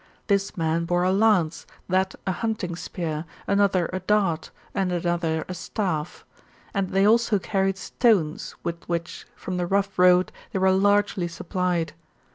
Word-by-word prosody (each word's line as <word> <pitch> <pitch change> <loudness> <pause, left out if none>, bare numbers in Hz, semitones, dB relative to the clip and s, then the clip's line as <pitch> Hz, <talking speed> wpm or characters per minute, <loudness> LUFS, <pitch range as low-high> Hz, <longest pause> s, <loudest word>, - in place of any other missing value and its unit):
This 200 -1 0
man 165 0 0
bore 175 +1 +1
a 185 - +3
lance, 195 -5 +2 0.2
that 190 +1 +1
a 190 - +1
hunting 190 -3 -2
spear, 160 -3 -4 0.2
another 200 -3 +2
a 185 - -1
dart, 190 -4 +1 0.2
and 190 -2 0
another 170 -2 -1
a 185 - -4
staff. 180 -3 -3 0.5
And 195 -2 0
they 195 +1 +3
also 225 0 +4
carried 195 0 0
stones, 195 -8 +1
with 170 0 -4
which, 170 0 -4
from 185 -1 -5
the 175 -1 -1
rough 195 0 0
road, 180 0 +5 0.2
they - - 0
were 190 0 +4
largely 205 -1 +2
supplied. 175 -1 -2
185 Hz, 150 wpm, -25 LUFS, 170-200 Hz, 0.5 s, road